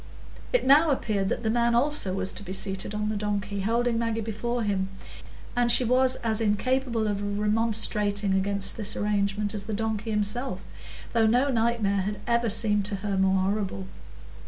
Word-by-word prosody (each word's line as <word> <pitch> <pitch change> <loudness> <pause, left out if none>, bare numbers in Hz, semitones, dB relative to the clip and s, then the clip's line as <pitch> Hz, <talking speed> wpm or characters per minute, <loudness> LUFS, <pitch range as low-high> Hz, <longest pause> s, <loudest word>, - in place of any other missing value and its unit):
It - - +1
now 295 +5 +6
appeared 210 -8 0
that - - -2
the 220 - +1
man 235 0 +2
also 245 -7 +2
was 190 0 -2
to - - -4
be 190 -2 -6
seated 195 +1 -4
on 210 0 -1
the 215 - -2
donkey, 205 -1 -2
holding 230 +3 +1
Maggie 230 -1 -1
before 225 +2 -3
him, 195 -2 -1 0.7
and 240 -1 +3
she 250 - +3
was 255 +2 +3
as 225 -1 +1
incapable 230 +2 0
of 205 0 -2
remonstrating 210 -2 +1
against 195 +1 0
this 210 -1 0
arrangement 205 0 -1
as 200 -2 -4
the 215 -1 -3
donkey 220 0 -2
himself, 210 0 -2 0.5
though 225 -1 +3
no 250 +5 +3
nightmare 225 -4 +1
had 205 +2 -3
ever 235 -1 +1
seemed 210 -1 +2
to 205 0 -3
her 200 -1 -1
more 190 0 +2
horrible. 195 -2 -3
210 Hz, 175 wpm, -26 LUFS, 200-235 Hz, 0.7 s, now